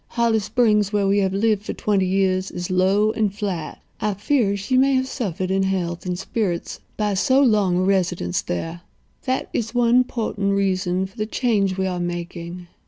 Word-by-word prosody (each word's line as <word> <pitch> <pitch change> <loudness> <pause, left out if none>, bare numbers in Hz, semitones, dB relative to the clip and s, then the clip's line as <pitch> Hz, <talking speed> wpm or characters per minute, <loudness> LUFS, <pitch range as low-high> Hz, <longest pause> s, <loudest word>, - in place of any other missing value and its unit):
Holly 230 -2 +3
Springs, 210 -2 +2
where 205 -2 +1
we 200 +1 +3
have 190 -1 +1
lived 205 +1 +1
for 210 - -5
twenty 195 -3 0
years, 190 0 +1
is 175 +1 -5
low 195 +4 +3
and 215 -2 0
flat. 195 -6 -5 0.2
I 210 -2 -1
fear 225 +2 +1
that 200 - -1
she 200 +6 -1
may 270 +1 +4
have 260 0 +1
suffered 190 - -3
in 195 0 +2
health 185 -2 -2
and 180 -1 -2
spirits 190 -2 -3 0.2
by 210 -1 0
so 260 +8 +3
long 205 -7 +3
a - - +2
residence 180 - 0
there. 165 - -4 0.4
That 260 0 -1
is 225 +1 -2
one 245 +1 +4
portent 210 -5 -2
reason 185 -1 0
for 190 +4 -13
the 215 0 -2
change 205 -6 0
we 190 - 0
are 180 -1 -2
making. 175 0 -5
195 Hz, 190 wpm, -22 LUFS, 185-215 Hz, 0.4 s, may